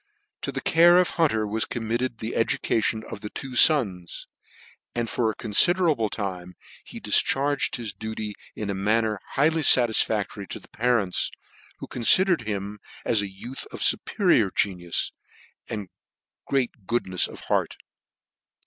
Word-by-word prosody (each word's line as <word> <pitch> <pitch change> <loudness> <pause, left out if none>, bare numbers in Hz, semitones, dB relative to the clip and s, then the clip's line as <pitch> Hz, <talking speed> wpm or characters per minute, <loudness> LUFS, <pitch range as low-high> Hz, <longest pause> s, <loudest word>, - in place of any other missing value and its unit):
To - - -4
the - - -5
care 170 +2 +5
of 180 -1 +3
Hunter 125 -10 +1
was 110 +2 -1
committed 120 +1 -3
the 110 +1 -5
education 110 -1 0
of 100 - -7
the 105 - -6
two 130 +2 -7
fons; 100 - +3 0.7
and 120 -1 -1
for 115 0 0
a 110 - -4
confi 140 - +5
derable 155 - +1
time 90 -4 -5 0.3
he - - -10
difcharged 140 +1 +1
his 115 -4 -5
duty 110 -1 -6 0.2
in 105 -2 -4
a - - -2
manner 105 +2 0
highly 160 +3 +2
fatisfactory 110 -6 +3
to - - -7
the - - -19
parents, 115 -5 0 0.5
who - - -8
confidered 165 - +2
him 100 0 -4 0.3
as 110 -3 +2
a 100 - -5
youth 120 +7 -8
of - - -8
fuperior 175 - +2
genius, 90 -4 -1 0.6
and 105 -4 -5 0.6
great 120 -7 -2
good* 120 +1 0
nefs 90 -1 +1
of - - -11
heart. - - -1
110 Hz, 150 wpm, -25 LUFS, 100-130 Hz, 0.7 s, care